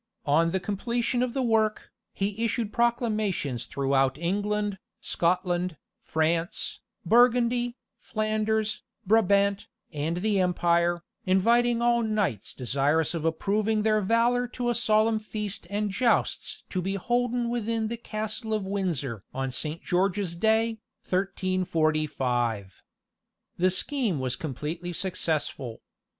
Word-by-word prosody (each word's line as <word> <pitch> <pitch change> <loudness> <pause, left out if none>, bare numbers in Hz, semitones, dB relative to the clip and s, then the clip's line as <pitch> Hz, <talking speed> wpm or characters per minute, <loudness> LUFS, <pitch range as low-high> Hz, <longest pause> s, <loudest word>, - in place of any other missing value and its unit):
On 160 +3 +3
the 190 +3 0
completion 235 +5 -1
of 250 0 -1
the 265 - +1
work, 220 -2 +1 0.2
he 205 +3 -2
issued 225 -1 -1
proclamations 215 - 0
throughout 135 -1 +1
England, 205 +3 -1 0.2
Scotland, 175 -1 0 0.2
France, 165 +2 -1 0.3
Burgundy, 245 +1 +3 0.2
Flanders, 215 0 -1 0.2
Brabant, 200 -1 +3 0.3
and 155 +3 -2
the 200 +1 +1
Empire, 175 -1 +2 0.2
inviting 235 +5 +3
all 240 0 +3
knights 210 - -1
desirous 140 +6 +1
of 165 -2 -3
approving 210 +6 +1
their 215 -1 +3
valour 235 +4 +2
to 245 0 -2
a - - +1
solemn 220 -1 +3
feast 210 -2 -5
and 205 0 -1
jousts 235 +4 0
to 185 - -1
be 195 +2 -2
holden 245 +3 0
within 230 -1 -1
the 235 - -3
castle 220 0 -3
of 210 -3 -2
Windsor 165 - -2
on 135 0 -2
Saint 155 +5 -1
George's 185 0 0
Day, 220 +3 +2 0.3
1345. 155 - 0 0.8
The 185 +1 +3
scheme 220 - 0
was 130 -1 -1
completely 160 +5 -4
successful. 155 -9 -2
200 Hz, 115 wpm, -27 LUFS, 165-225 Hz, 0.8 s, On